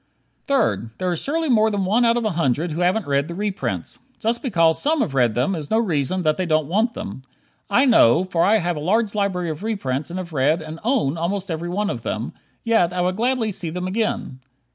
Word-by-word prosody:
Third: 115 - +1
There 185 -1 -1
is 170 - -2
surely 320 +3 -1
more 220 -4 +4
than 200 -3 -1
one 225 +6 +3
out 230 0 +3
of 235 - -1
a 215 - +1
hundred 160 0 0
who 165 +4 -3
haven't 185 +3 +1
read 140 0 0
the 170 - -6
reprints. 205 0 -3 0.2
Just 235 +1 -1
because 165 - +2
some 305 0 +1
have 140 - -1
read 120 -5 +2
them 130 +10 +1
is 155 -5 -5
no 220 - +2
reason 180 - 0
that 155 -1 +2
they 185 -2 -1
don't 155 -2 +2
want 215 - 0
them. 100 +7 -6 0.5
I 245 +7 +4
know, 180 - +5
for 175 -3 0
I 215 +3 +4
have 175 -3 -1
a - - -4
large 205 +7 +1
library 190 -5 -1
of 155 - -7
reprints 155 - -2
and 175 - -5
have 175 -3 -6
read, 145 +4 +2
and 155 0 -8
own, 215 - +1
almost 190 +2 -2
every 165 +2 -3
one 205 +3 -1
of - - -5
them, - - -4 0.3
yet 225 -7 +2
I 180 0 -1
would 180 +1 0
gladly 235 0 0
see 180 -3 -3
them 180 +3 -4
again. 190 - -2
180 Hz, 230 wpm, -22 LUFS, 160-220 Hz, 0.5 s, know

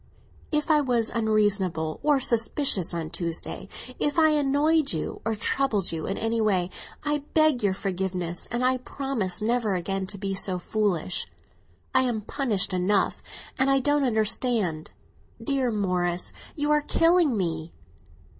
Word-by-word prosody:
"If 300 +1 +1
I 300 -1 +5
was 240 -5 +1
unreasonable 205 -8 +1
or 295 -2 +3
suspicious 235 - +2
on 165 -2 -4
Tuesday—if 195 - -4
I 315 -1 +6
annoyed 295 - +2
you 160 - -4
or 225 0 -1
troubled 215 -3 0
you 160 -1 -4
in 195 - -2
any 225 0 0
way—I 215 +9 -2 0.2
beg 310 -5 +4
your 200 -2 +1
forgiveness, 180 -3 -3
and 240 +2 -1
I 255 0 +3
promise 245 -9 -3
never 225 -3 +1
again 190 +2 -2
to 200 - -7
be 195 0 -3
so 190 -1 -1
foolish. 185 -2 -1 0.7
I - - +5
am 240 -4 -1
punished 210 -5 -1
enough, 185 +2 +1 0.4
and 265 +1 +3
I 270 0 +4
don't 290 +2 +2
understand. 220 -7 0 0.5
Dear 275 -3 0
Morris, 180 -4 -1 0.2
you 295 -1 0
are 300 0 +4
killing 330 -4 +3
me!" 165 -3 -2
220 Hz, 140 wpm, -26 LUFS, 185-275 Hz, 0.7 s, I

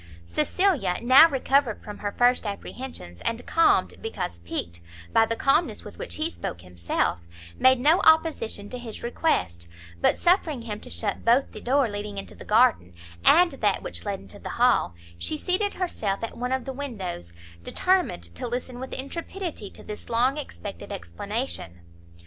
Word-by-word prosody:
Cecilia 275 - +1
now, 265 +7 +8
recovered 270 -4 +1
from 210 - -8
her 205 - -3
first 245 0 +2
apprehensions, 200 - -7
and 230 +1 -2
calmed, 330 0 +3
because 445 - -4
piqued, 85 0 -4 0.3
by 225 - +5
the 230 - -1
calmness 275 +8 +1
with - - -11
which - - -3
he 315 +2 -1
spoke 85 - -6
himself, 85 -1 -1 0.4
made 260 -1 +5
no 310 +8 +4
opposition 315 -10 +3
to 250 - -6
his 230 -3 -7
request, 90 - -1 0.3
but - - +3
suffering 330 -8 +2
him 215 -2 -5
to - - -6
shut 205 -3 0
both 240 +4 +3
the 215 - -9
door 265 +1 +2
leading 205 -1 -5
into 195 - -6
the - - -11
garden, 215 - +3 0.3
and 350 0 +6
that 210 -7 0
which - - -4
led 200 -2 -3
into - - -11
the - - -7
hall, 240 - +2 0.2
she 85 - -1
seated 385 - 0
herself 220 - -2
at 230 - -4
one 250 +1 -3
of 260 0 -1
the 265 - -4
windows, 195 - -5 0.3
determined 365 - +1
to 85 - -5
listen 245 +1 -4
with 260 - -6
intrepidity 330 - -5
to - - -15
this 210 +2 -8
long 245 +4 +2
expected 280 - -7
explanation. 90 - -5
240 Hz, 165 wpm, -26 LUFS, 200-280 Hz, 0.4 s, now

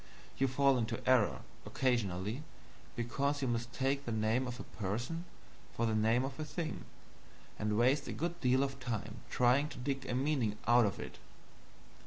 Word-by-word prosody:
You 135 - +4
fall 135 0 +3
into 115 -1 -3
error 125 -5 +4 0.2
occasionally, 110 -2 0 0.5
because 140 +4 -1
you - - +1
mistake 125 +4 -1
the 120 - -4
name 110 +4 +1
of 125 0 -5
a - - -5
person 120 - -3 0.5
for 115 - +1
the 110 - +1
name 110 +4 +3
of 135 +2 -6
a - - -1
thing, 160 +1 -4 0.7
and 105 0 0
waste 135 +5 +3
a - - -3
good 170 +1 -3
deal 130 +1 +4
of 135 0 -3
time 120 -5 -4
trying 130 +4 +3
to 140 - -9
dig 135 +1 -3
a 120 - -1
meaning 130 -6 +1
out 120 -1 +6
of 100 - -4
it. - - -7
125 Hz, 170 wpm, -34 LUFS, 115-140 Hz, 0.7 s, out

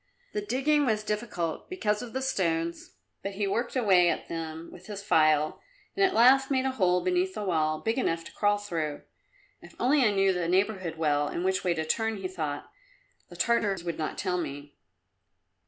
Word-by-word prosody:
The 415 - -1
digging 295 -4 +1
was 215 -2 +1
difficult 210 -6 -3
because 215 - -1
of 245 -2 -7
the 265 0 -2
stones, 170 -8 -1 0.3
but 195 +1 -4
he 200 +1 -1
worked 235 +6 -1
away 190 -8 +4
at - - -3
them 165 0 -6
with 180 +2 -13
his 200 -2 -6
file 155 -4 +3 0.3
and 395 - +2
at 375 -2 +3
last 270 +3 +6
made 265 -1 +1
a 265 - +1
hole 180 -7 +2
beneath 365 +1 0
the - - -3
wall 155 -4 0
big 225 +7 -1
enough 165 -9 0
to - - -11
crawl 205 0 +2
through. 165 -8 -4 0.6
"If - - -15
only 270 +2 +3
I 225 - +5
knew 195 -1 +3
the 175 -2 -1
neighbourhood 185 -2 0
well 145 -2 +1
and 175 +4 -3
which 190 0 +1
way 175 -2 +1
to 160 -1 -2
turn," 225 +6 0
he 190 -1 -4
thought; 155 -6 -5 0.6
"the - - -12
Tartars 205 -6 +1
would 170 -2 -4
not 155 - -3
tell 180 -1 -1
me." 145 -2 -6
195 Hz, 195 wpm, -28 LUFS, 165-235 Hz, 0.6 s, last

